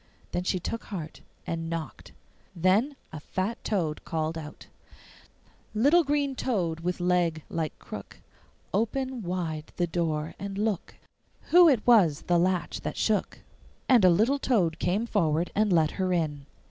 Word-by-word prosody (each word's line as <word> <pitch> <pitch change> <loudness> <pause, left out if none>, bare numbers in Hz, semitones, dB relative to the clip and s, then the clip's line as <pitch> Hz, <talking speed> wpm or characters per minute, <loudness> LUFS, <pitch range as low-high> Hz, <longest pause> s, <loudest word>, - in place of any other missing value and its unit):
Then 180 - -1
she 185 0 0
took 230 +6 -5
heart 170 -6 -7 0.2
and 165 0 -3
knocked. 160 -7 -6 0.4
Then 195 - +2 0.2
a 155 - -5
fat 190 +9 -3
toad 165 -8 -1
called 160 0 -2
out: 155 -2 -8 1.1
'Little 290 +10 +5
green 285 -1 0
toad 180 -11 -1
with 180 +2 -2
leg 175 -3 +1
like 160 -2 -3
crook, - - -9 0.5
Open 255 +4 -1
wide 170 -4 -4
the 175 - +2
door, 160 -2 -2
and 200 0 -5
look 210 -3 -2 0.6
Who 350 -1 +8
it 250 -7 +2
was 190 -12 +5
the 175 -1 +2
latch 180 0 0
that - - -5
shook.' 215 -3 0 0.5
And 245 -6 +5
a 185 - +8
little 225 +11 +3
toad 185 -12 +1
came 195 +6 0
forward 170 -6 0
and 210 -1 +2
let 160 -3 +3
her 185 -1 -1
in. 150 -5 -1
180 Hz, 150 wpm, -27 LUFS, 165-220 Hz, 1.1 s, Who